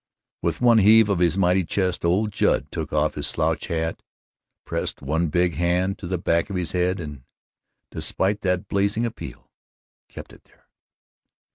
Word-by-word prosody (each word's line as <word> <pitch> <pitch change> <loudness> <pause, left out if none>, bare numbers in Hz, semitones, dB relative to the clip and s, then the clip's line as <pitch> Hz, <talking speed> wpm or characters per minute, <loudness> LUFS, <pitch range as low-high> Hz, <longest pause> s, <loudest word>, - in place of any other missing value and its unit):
With - - -2
one 120 -2 +6
heave 110 +1 +6
of 100 -4 +1
his 85 0 +2
mighty 95 0 +3
chest 90 +1 -1
old 95 +5 +1
Judd - - +1
took 80 -2 -5
off 75 0 +1
his - - -3
slouch - - -1
hat, 80 0 -2 0.6
pressed - - -4
one 80 +5 0
big 90 +2 +1
hand 90 +3 0
to 90 - -7
the 90 +1 -1
back 85 0 0
of 100 - -4
his 90 -3 -2
head 90 +1 0
and, 75 -5 -7 0.7
despite 100 +2 -1
that 90 -2 -1
blazing 100 +3 0
appeal, 115 - -8 0.6
kept - - -11
it - - -18
there. - - -29
90 Hz, 165 wpm, -23 LUFS, 85-100 Hz, 0.7 s, one